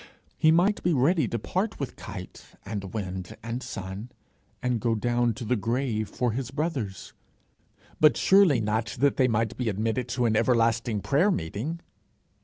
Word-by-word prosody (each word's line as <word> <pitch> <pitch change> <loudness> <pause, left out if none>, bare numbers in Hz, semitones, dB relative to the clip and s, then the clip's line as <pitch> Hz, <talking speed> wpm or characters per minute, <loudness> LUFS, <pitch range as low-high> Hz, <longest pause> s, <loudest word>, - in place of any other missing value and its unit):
He 155 - +4
might 180 +6 +3
be 175 - +2
ready 145 +2 +3
to 115 - -2
part 190 - -2
with 140 - -4
kite 95 -3 -10
and 100 -2 -5
wind 95 0 -5
and 115 +2 -4
sun, 95 +3 -6 0.5
and 125 -2 0
go 115 0 +1
down 120 +1 +1
to 125 - -6
the 125 +3 +1
grave 115 0 -1
for 125 -2 -1
his 120 +1 -3
brothers 135 - -3 0.9
but 155 -1 +5
surely 190 -9 +5
not 110 +2 -1
that 140 +2 +3
they 130 - +4
might 115 -1 0
be 125 -3 0
admitted 110 +4 -1
to 125 0 0
an 110 -1 +2
everlasting 115 -2 +2
prayer 150 - +3
meeting! 125 - -3
120 Hz, 165 wpm, -27 LUFS, 110-140 Hz, 0.9 s, but